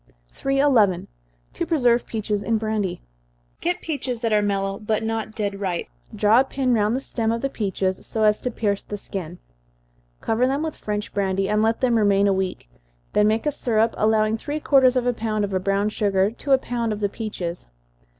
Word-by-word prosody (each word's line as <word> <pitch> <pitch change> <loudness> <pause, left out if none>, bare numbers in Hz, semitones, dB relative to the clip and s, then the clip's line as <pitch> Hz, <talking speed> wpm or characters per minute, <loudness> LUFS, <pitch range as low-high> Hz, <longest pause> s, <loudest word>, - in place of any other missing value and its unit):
311. 270 -9 +2 0.5
To - - -2
Preserve 245 -7 +2
Peaches 210 -2 -2
in 225 +2 +1
Brandy. 215 - -2 0.6
Procure 350 +1 +1
peaches 265 -7 -2
that 230 -2 0
are 210 - +4
mellow, 195 -1 -1
but 215 0 -1
not 220 -1 -3
dead 200 -2 -2
ripe 185 -4 -2 0.3
draw 215 +3 +5
a - - +5
pin 265 -1 0
round 215 0 +2
the 265 - -2
seam 225 -4 -2
of 230 0 -2
the 275 - -1
peaches, 190 -4 -2
so 220 - -2
as 210 0 +3
to 250 - -1
pierce 205 -4 -1
the 205 - -6
skin 180 -4 -6 0.8
cover 235 +3 +1
them 275 +3 0
with 320 -1 -3
French 210 0 -4
brandy, 195 -1 0
and 210 +1 +2
let 225 +1 +1
them 245 -3 +3
remain 200 -1 +3
a 200 - +3
week 190 - -3 0.5
then 210 0 +4
make 220 +4 +1
a 295 - +2
syrup, 225 -4 +1
allowing 215 0 +2
three 295 +5 -3
quarters 265 -4 +4
of 250 -1 +1
a 245 - +2
pound 215 -2 -1
of 200 - -7
brown 195 +1 +1
sugar 200 -2 +1
to 275 +4 -5
a 270 - +7
pound 240 -3 -2
of 210 - -3
the 205 - +1
peaches. 195 -5 -5
215 Hz, 200 wpm, -23 LUFS, 200-245 Hz, 0.8 s, a